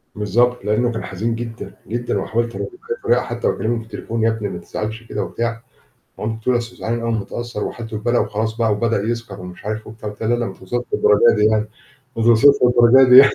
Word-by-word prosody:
بالضبط 120 +2 +1
لأنه 110 +4 +1
كان 110 - -4
حزين 110 +5 -2
جدًا، 115 0 -7
جدًا. 120 +2 -2
وحاولت 115 +1 -2
أراضيه - - -4
بكذا 455 +5 -6
طريقة - - +3
حتى - - -3
وأكلمه 120 +1 0
في - - -8
التليفون 115 0 -4
"يا 115 - +4
ابني 110 -2 -2
ما 90 - -5
تزعلش 110 +2 -5
كده" 105 -2 -3
وبتاع. 115 +2 -3 0.6
مامته 110 +1 -3
بتقول 125 +3 +1
لي: - - +5
"أصله 120 +1 -10
زعلان 120 +1 -2
أوي 115 - -2
ومتأثر 115 0 -3
وحالته 115 -2 -5
بالبلا 120 +3 +1
وخلاص 110 +1 -2
بقى 115 -2 +2
وبدأ 110 0 +1
يسكر 115 -3 -4
ومش 90 +1 -10
عارف 110 +1 -4
وبتاع."، 110 -1 -7
قُلت 105 - -13
لها: 110 - 0
"لا 120 - +3
لا 120 - -1
ما 95 - -5
توصلش 120 +7 -4
للدرجة 105 +3 +5
دي 105 - +3
يعني، 110 0 +2 0.5
ما 115 - 0
توصلش 115 +2 +5 0.2
للدرجة 125 +1 +6
دي 125 - +9
يعني." 140 - +9
115 Hz, 225 wpm, -20 LUFS, 110-120 Hz, 0.6 s, دي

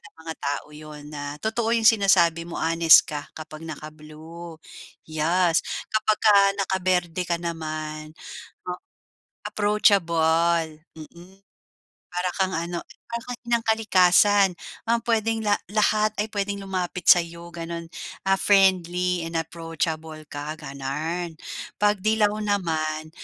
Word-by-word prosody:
ng - - -58
mga 160 - -4
tao, 145 0 -2
'yon 150 -1 -10
na 145 -1 -6 0.2
totoo 220 +3 -1
yung 225 -1 +1
sinasabi 190 -6 +4
mo, - - -6
honest 165 0 +6
ka, 145 -1 -6
kapag 155 0 -9
naka-blue. 155 +2 -10 0.5
Yes. 165 +2 +2 0.3
Kapagka 215 -1 +3 0.2
naka-berde 185 -2 0
ka 170 - +1
naman, 155 -2 -5 1.4
approachable. 170 -6 +2 0.2
Mm. 175 +5 -13 0.8
Para 180 0 0
kang 190 -1 +1
ano, 170 +1 -3 0.3
para 235 0 -4
kang 245 0 -5
inang 235 -1 +1
kalikasan. 205 -2 +4 0.4
Um, 230 0 +2
puwedeng 225 -1 0
la 205 -1 +3 0.2
lahat 215 0 +2
ay 215 - -1
puwedeng 200 0 -2
lumapit 180 -2 -3
sa'yo, 170 0 +4
gano'n. 170 0 -6 0.4
Ah, 195 0 +3
friendly 180 -2 +3
and 165 0 -4
approachable 160 -1 -4
ka, 145 +1 -5
gano'n. 155 +4 -4 0.4
'Pag 210 -1 +2
'dilaw 215 -1 +3
naman, 155 -6 -1
170 Hz, 115 wpm, -24 LUFS, 160-200 Hz, 1.4 s, honest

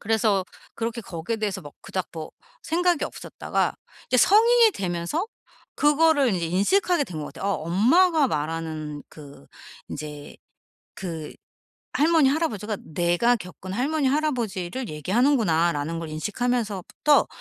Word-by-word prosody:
그래서 215 -3 +1 0.3
그렇게 230 +1 -3
거기에 190 +3 -4
대해서 205 -3 -2
막 145 - -11
그닥 185 -1 -3
뭐 160 -2 -7 0.3
생각이 345 -1 +1
없었다가 - - -2 0.3
이제 255 - +3
성인이 460 - +6
되면서 180 - -2 0.5
그거를 295 -2 +4
인제 170 -2 -1
인식하게 290 - +2
된 165 -8 -7
것 150 - -5
같아요. - - -8
'어 - - 0
엄마가 280 - +4
말하는 155 -2 -3
그 140 - -13 0.4
인제 150 -1 -8 0.6
그 165 -5 -6 0.6
할머니, 310 -2 +4
할아버지가 220 - -1 0.2
내가 175 +8 +3
겪은 185 -1 -9
할머니, 280 +5 0
할아버지를 250 - -1
얘기하는구나.'라는 170 - +1
걸 165 - -5
인식하면서부터 215 - 0
210 Hz, 315 characters per minute, -25 LUFS, -, 0.6 s, 성인이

